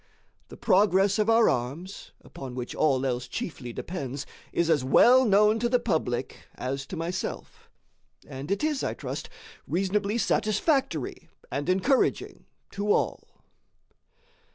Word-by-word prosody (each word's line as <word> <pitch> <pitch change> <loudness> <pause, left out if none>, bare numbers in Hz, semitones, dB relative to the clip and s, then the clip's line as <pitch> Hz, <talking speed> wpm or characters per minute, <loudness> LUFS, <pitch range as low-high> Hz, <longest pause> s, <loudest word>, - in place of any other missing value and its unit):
The - - -12
progress 200 0 +3
of 215 +1 +2
our 225 0 +5
arms, 140 +11 -3
upon 130 -2 -9
which 125 -1 -5
all 135 -3 +1
else 125 -1 -2
chiefly 140 - -5
depends, 140 -2 -5 0.3
is 170 - +1
as 155 -5 +2
well 250 - +6
known 210 +1 +4
to 235 +1 0
the 250 - +4
public 155 - -2
as 135 +1 -4
to 185 - -6
myself; 170 +2 -5 0.6
and 135 +3 -7
it 200 +8 -1
is, 305 -3 0
I - - -2
trust, - - -6 0.4
reasonably 200 +4 0
satisfactory 215 - 0 0.2
and 145 +4 -3
encouraging 240 +9 +1 0.2
to 205 +1 -1
all. - - -2
185 Hz, 130 wpm, -27 LUFS, 135-215 Hz, 0.6 s, well